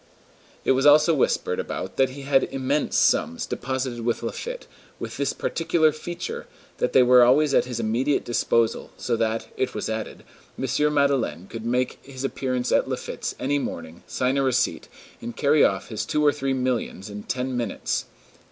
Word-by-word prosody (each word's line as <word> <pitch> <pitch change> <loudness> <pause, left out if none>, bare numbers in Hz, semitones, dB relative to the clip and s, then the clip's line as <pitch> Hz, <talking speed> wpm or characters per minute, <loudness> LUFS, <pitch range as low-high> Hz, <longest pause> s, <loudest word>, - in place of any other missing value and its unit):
It - - +4
was 135 +2 +3
also 150 +3 +6
whispered 140 - +1
about - - -5
that 135 -1 +4
he 140 +2 -9
had 135 -1 +3
"immense" 135 +2 -1
sums 85 - +2
deposited 130 -2 -3
with 120 0 -1
Laffitte, 485 - -5 0.3
with - - -6
this - - 0
peculiar 165 -1 +1
feature, 170 +3 -6 0.3
that - - 0
they 130 - +7
were 125 0 +7
always 140 +4 +4
at - - +4
his 125 -2 -4
immediate 120 +6 0
disposal, 115 -1 +1
so 120 - -1
that, 115 0 -1
it 130 - -1
was 105 - -3
added, 110 0 -5 0.3
M. 150 +3 +1
Madeleine 135 - +1
could 115 +3 -8
make 125 +1 0
his 135 -1 -8
appearance 130 -2 -2
at - - +2
Laffitte's - - -4
any 145 +2 0
morning, 85 - -6
sign 130 +2 0
a - - +3
receipt, 130 -10 0 0.3
and 120 - -7
carry 145 +1 +4
off 95 -1 +1
his 110 -2 -3
two 150 +6 0
or 145 - +6
three 135 -2 -1
millions 125 -6 -2
in 105 0 -6
ten 130 +3 -3
minutes. 120 -4 -2
130 Hz, 175 wpm, -24 LUFS, 115-140 Hz, 0.3 s, they